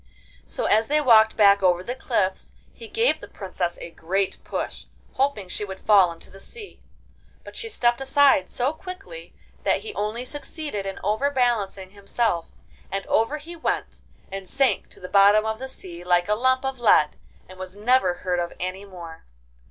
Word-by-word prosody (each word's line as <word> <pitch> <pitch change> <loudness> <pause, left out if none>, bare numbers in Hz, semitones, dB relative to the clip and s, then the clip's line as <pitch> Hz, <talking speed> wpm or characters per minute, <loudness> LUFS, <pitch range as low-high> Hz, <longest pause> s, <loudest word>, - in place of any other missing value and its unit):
So - - -2
as 220 +2 +3
they 300 +1 +3
walked 225 -6 +5
back 200 -2 +6
over 180 -1 +3
the 245 - -4
cliffs 210 -7 -1 0.2
he 460 - -11
gave 450 +3 +1
the - - -10
Princess 185 -3 -4
a 170 - -8
great 190 +4 -2
push, - - -5 0.3
hoping 265 -8 0
she 180 - -4
would 190 -2 -7
fall 195 -5 +5
into 165 - -13
the 195 - -13
sea; 420 - -11 0.6
but - - -12
she 455 - -3
stepped 240 - +2
aside 270 -7 +4
so 255 +4 -1
quickly 390 +9 -10 0.3
that - - +1
he 435 -1 -7
only 220 - -3
succeeded 290 -6 -5
in 195 - -5
overbalancing 220 -5 0
himself, 200 -3 -1 0.4
and 195 0 -3
over 225 +7 +1
he 325 +3 -10
went, 325 - -3 0.3
and 195 -1 -7
sank 270 -1 +1
to - - -14
the 180 - -8
bottom 200 +2 +5
of 220 0 -2
the 265 - -5
sea 175 -8 -9
like 175 0 +2
a 210 - +2
lump 260 +4 +2
of 265 -1 -3
lead, 155 -10 +4 0.3
and 185 0 -14
was 185 0 -7
never 210 -4 +2
heard 180 -1 +1
of 175 0 -3
any 185 +2 -4
more. 170 -4 -11
210 Hz, 180 wpm, -24 LUFS, 185-265 Hz, 0.6 s, back